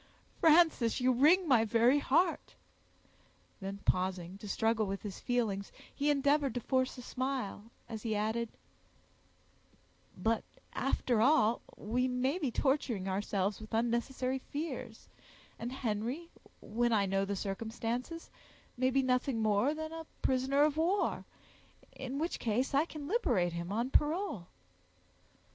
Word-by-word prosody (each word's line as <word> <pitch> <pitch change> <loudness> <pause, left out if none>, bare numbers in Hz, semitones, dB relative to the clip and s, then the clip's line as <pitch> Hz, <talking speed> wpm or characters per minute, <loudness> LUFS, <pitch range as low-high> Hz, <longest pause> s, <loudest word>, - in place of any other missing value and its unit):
"Frances, 315 -8 +4
you 255 0 +3
wring 315 +9 +5
my 245 -6 +5
very 235 +5 +4
heart!" 330 +5 +1 1.0
Then 200 0 -6
pausing, 185 0 0
to 210 - -8
struggle 220 0 +1
with 195 0 -4
his 205 -3 -6
feelings, 220 -6 -1 0.2
he 290 +1 0
endeavored 285 -2 +2
to - - 0
force 260 +2 0
a 250 - -8
smile, 255 -6 -3 0.2
as 220 -2 -6
he 220 -1 -1
added, 220 +2 -1 1.7
"But, 225 0 0 0.3
after 250 -3 +1
all, 235 -3 +4 0.2
we 245 +5 0
may 260 +6 0
be 290 -7 0
torturing 245 -7 0
ourselves 195 +1 -1
with 215 +1 -5
unnecessary 245 +3 0
fears, 300 +5 -6 0.5
and 240 +2 -4
Henry, 255 +6 -3 0.3
when 240 +2 0
I 205 -2 +3
know 195 0 +1
the 200 +1 -2
circumstances, 230 - -4 0.5
may 255 +1 +2
be 270 +1 +2
nothing 250 -1 +1
more 220 +7 +2
than 315 0 -5
a 325 -1 -7 0.2
prisoner 265 +2 +2
of 300 0 +2
war; 355 +6 +1 0.7
in 265 +1 -6
which 330 +4 -2
case, 245 +5 0
I 285 +3 +4
can 305 -4 -8
liberate 250 - +1
him 170 +2 -4
on 235 +5 -1
parole." 300 - +1
245 Hz, 135 wpm, -32 LUFS, 215-280 Hz, 1.7 s, wring